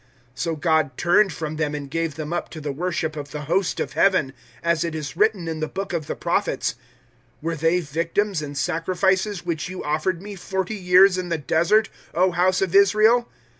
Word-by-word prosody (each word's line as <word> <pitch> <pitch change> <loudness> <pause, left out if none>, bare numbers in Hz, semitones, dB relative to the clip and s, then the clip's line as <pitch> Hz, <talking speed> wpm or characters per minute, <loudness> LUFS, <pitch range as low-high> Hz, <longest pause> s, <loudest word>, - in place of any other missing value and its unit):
007:042 - - -16
So 165 -1 -1
God 155 -4 +1
turned 190 +3 +3
from 155 -1 -5
them 150 -1 -1
and 145 -1 -5
gave 165 +1 -2
them 155 +1 -5
up 175 - -3
to 160 - -8
the 150 -1 -4
worship 160 0 -2
of 145 -1 -6
the 150 +1 -6
Host 175 +6 0
of - - -3
Heaven, 185 -9 +2 0.3
as 170 -1 +1
it 165 -2 -3
is 155 0 -5
written 205 -3 +1
in 160 -1 -3
the 155 - -1
Book 195 +2 -5
of 160 -3 -2
the - - -3
Prophets, - - -1 0.7
"'Were 165 +2 -2
they 165 +3 +2
victims 165 +5 -1
and 145 -1 -6
sacrifices 185 +5 0
which 170 -1 -3
you 185 - -6
offered 155 +4 -1
Me, 205 +3 -8
forty 190 +1 -3
years 185 -1 +5
in 180 -1 -4
the 165 - 0
Desert, 170 - +2 0.3
O 185 +2 +3
House 180 +2 +2
of 185 -2 -2
Israel? 215 +5 +5
170 Hz, 205 wpm, -23 LUFS, 155-190 Hz, 0.7 s, years